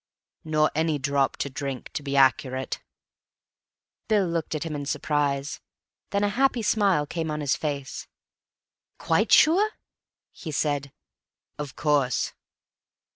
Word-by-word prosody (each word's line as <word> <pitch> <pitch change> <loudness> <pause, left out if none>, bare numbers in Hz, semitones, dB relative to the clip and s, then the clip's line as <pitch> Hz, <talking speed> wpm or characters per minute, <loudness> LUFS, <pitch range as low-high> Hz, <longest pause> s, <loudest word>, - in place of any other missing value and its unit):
"'Nor 155 -1 +2
any 160 0 +1
drop 140 0 0
to - - -2
drink,' 135 -2 -5
to - - -3
be 140 -1 -2
accurate." 130 -1 +2 1.3
Bill 210 -3 +3
looked 165 -2 -2
at 155 - -2
him 165 -2 -4
in 145 -1 -4
surprise. 145 -1 -1 0.5
Then 200 0 0
a 205 - +3
happy 250 +1 +1
smile 200 -8 +3
came 160 +1 -3
on 150 0 -2
his 145 -3 +1
face. 140 -3 -4 0.9
"Quite - - +1
sure?" 395 +7 +6 0.6
he 160 - -7
said. 145 -2 -1 0.7
"Of 145 -2 -5
course." 145 -4 +1
150 Hz, 130 wpm, -26 LUFS, 140-165 Hz, 1.3 s, sure